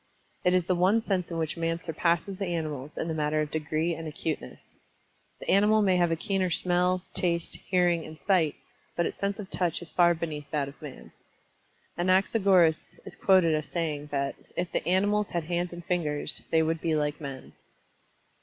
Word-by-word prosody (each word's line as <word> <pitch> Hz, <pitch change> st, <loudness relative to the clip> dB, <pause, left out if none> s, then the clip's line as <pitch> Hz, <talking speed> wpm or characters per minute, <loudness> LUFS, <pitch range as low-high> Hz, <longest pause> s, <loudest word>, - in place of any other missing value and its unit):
It 180 Hz, 0 st, +4 dB
is 180 Hz, -2 st, +2 dB
the 185 Hz, -, +2 dB
one 185 Hz, +5 st, +3 dB
sense 195 Hz, -5 st, -1 dB
in 170 Hz, -, -4 dB
which 160 Hz, -2 st, -1 dB
Man 165 Hz, 0 st, -1 dB
surpasses 170 Hz, +3 st, -1 dB
the 195 Hz, -, -2 dB
animals 150 Hz, -5 st, -4 dB
in -, -, -2 dB
the 165 Hz, -, -1 dB
matter 155 Hz, 0 st, 0 dB
of 150 Hz, -1 st, -1 dB
degree 160 Hz, +2 st, -1 dB
and 165 Hz, 0 st, -6 dB
acuteness. 155 Hz, +1 st, -5 dB, 0.8 s
The -, -, -10 dB
animal 210 Hz, +2 st, +5 dB
may 190 Hz, -2 st, +3 dB
have 175 Hz, -1 st, +3 dB
a -, -, +2 dB
keener 190 Hz, +1 st, 0 dB
smell, 180 Hz, +1 st, +1 dB
taste, 170 Hz, -2 st, -1 dB
hearing 175 Hz, -2 st, +2 dB
and 155 Hz, 0 st, -10 dB
sight, 175 Hz, -7 st, +2 dB, 0.4 s
but 170 Hz, -, +1 dB
its -, -, -4 dB
sense 200 Hz, 0 st, -1 dB
of 200 Hz, -3 st, -8 dB
Touch 175 Hz, -3 st, 0 dB
is 175 Hz, -, -8 dB
far 175 Hz, -1 st, +4 dB
beneath 155 Hz, -3 st, -5 dB
that 145 Hz, -3 st, -1 dB
of 140 Hz, -, -12 dB
Man. 145 Hz, -4 st, -10 dB, 0.9 s
Anaxagoras 185 Hz, -2 st, +3 dB
is -, -, -8 dB
quoted 185 Hz, -4 st, +4 dB
as 155 Hz, -1 st, -1 dB
saying 150 Hz, -4 st, -2 dB
that 140 Hz, -1 st, -1 dB, 0.2 s
"if 175 Hz, 0 st, -2 dB
the -, -, -1 dB
animals 205 Hz, +3 st, +2 dB
had 170 Hz, -1 st, -2 dB
hands 175 Hz, +2 st, -2 dB
and 175 Hz, -1 st, -9 dB
fingers, 160 Hz, -5 st, -1 dB
they 160 Hz, 0 st, +3 dB
would 165 Hz, 0 st, -1 dB
be 160 Hz, -2 st, +1 dB
like 150 Hz, 0 st, -1 dB
men." 135 Hz, -2 st, -7 dB
170 Hz, 190 wpm, -28 LUFS, 155-185 Hz, 0.9 s, animal